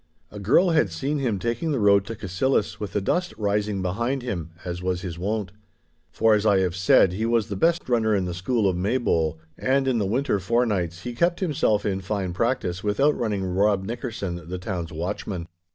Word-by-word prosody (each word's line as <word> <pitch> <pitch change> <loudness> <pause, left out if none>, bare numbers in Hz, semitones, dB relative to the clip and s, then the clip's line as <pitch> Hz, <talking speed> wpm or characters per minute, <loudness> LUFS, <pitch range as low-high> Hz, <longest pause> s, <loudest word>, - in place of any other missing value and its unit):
A 105 - -8
girl 140 - +4
had 155 -11 +3
seen 140 - -2
him 120 -7 0
taking 120 - -2
the 140 - 0
road 100 -2 +4
to 115 - -5
Cassillis 105 +4 -1
with 105 -2 -5
the 105 - 0
dust 175 - -1
rising 105 -1 0
behind 120 +8 -1
him, 90 -10 -4 0.2
as 90 0 -4
was 90 -1 -1
his 85 -3 -6
wont. 100 0 -2 0.6
For, 110 -1 +3
as 105 -1 +2
I 105 -3 +4
have 90 -2 0
said, 90 0 +4
he 110 +4 -1
was 115 -3 +1
the 100 - -3
best 170 - +1
runner 110 -3 +2
in 95 -2 0
the 90 - -3
school 100 +4 0
of 95 - +1
Maybole, 90 - 0 0.2
and 135 +1 +1
in 125 -3 +2
the 100 - 0
winter 120 0 0
forenights 95 -5 0
he 120 - -4
kept 170 +8 +1
himself 145 - +1
in 95 -2 -1
fine 95 -2 -2
practice 95 -4 -1
with 105 0 -1
outrunning 115 -9 +1
Rob 95 +2 +2
Nickerson, 100 -7 -5
the 90 - -3
town's 90 -4 -4
watchman. 90 +1 -4
105 Hz, 200 wpm, -24 LUFS, 95-120 Hz, 0.6 s, girl